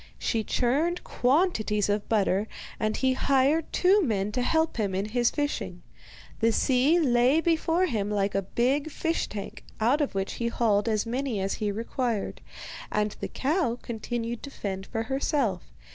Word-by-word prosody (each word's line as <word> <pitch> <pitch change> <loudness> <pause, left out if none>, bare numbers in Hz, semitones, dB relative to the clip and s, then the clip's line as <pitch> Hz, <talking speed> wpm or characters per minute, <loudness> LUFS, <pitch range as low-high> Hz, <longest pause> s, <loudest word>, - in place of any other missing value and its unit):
She 225 -2 -1
churned 290 +11 0
quantities 245 - +1
of 205 0 -1
butter, 205 -1 +2 0.3
and 215 0 0
he 260 -1 +2
hired 275 +4 +2
two 390 +3 +4
men 210 - 0
to 250 - -1
help 320 +4 +1
him 200 -4 -1
in 200 +3 -2
his 240 +1 +2
fishing. 290 -1 -3 0.6
The 230 0 +3
sea 265 +8 +3
lay 255 0 +4
before 330 +2 +2
him 215 - -1
like 200 -1 0
a 195 - +1
big 260 +10 0
fish 325 +2 -1
tank, 205 -2 -7 0.2
out 245 +7 +3
of 285 - -1
which 195 0 -2
he 235 - +1
hauled 225 -2 +1
as 215 0 0
many 245 -1 -2
as 195 0 -1
he 210 -1 -1
required; 230 0 -2 0.5
and 210 0 0
the - - -3
cow 275 -4 0
continued 235 0 -4
to 280 - -7
fend 190 -7 -5
for 225 - -2
herself. 265 - 0
240 Hz, 165 wpm, -27 LUFS, 210-285 Hz, 0.6 s, two